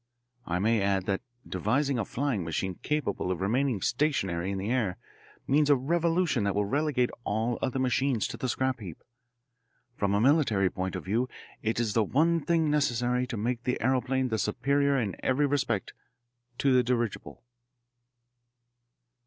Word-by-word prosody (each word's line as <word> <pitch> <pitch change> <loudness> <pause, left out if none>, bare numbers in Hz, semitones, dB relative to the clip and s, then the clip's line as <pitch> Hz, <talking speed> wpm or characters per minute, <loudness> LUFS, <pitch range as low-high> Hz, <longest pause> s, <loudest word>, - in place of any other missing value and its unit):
I 85 - 0
may 110 +3 +2
add 100 -1 +1
that 95 -1 -1 0.3
devising 125 - 0
a 105 - -1
flying 125 -6 -1
machine 85 +3 -2
capable 150 -11 -1
of 90 - -2
remaining 115 +2 0
stationary 95 - 0
in 100 - -2
the 100 +4 -2
air 110 -8 0 0.5
means 145 +2 +3
a 145 - +7
revolution 165 - +1
that 100 -1 0
will 105 0 +1
relegate 140 +1 +1
all 110 +2 -1
other 130 0 -1
machines 130 -2 +1
to - - -6
the 130 - -2
scrap 130 0 0
heap. 90 -7 -9 0.9
From 100 -2 0
a - - +3
military 115 - +3
point 95 0 -3
of - - -5
view 115 +7 0 0.3
it 110 +1 -1
is 115 -3 0
the 115 - +3
one 165 +9 +2
thing 165 -3 +2
necessary 125 -3 +1
to 120 - -4
make 120 +3 -1
the 125 - -1
aeroplane 130 0 +1
the 110 -1 -1
superior 140 +6 +1
in 105 -6 -2
every 135 +3 +1
respect 140 -1 -1 0.6
to 135 -2 +3
the 125 - +5
dirigible." 120 - -2
125 Hz, 160 wpm, -28 LUFS, 100-140 Hz, 0.9 s, a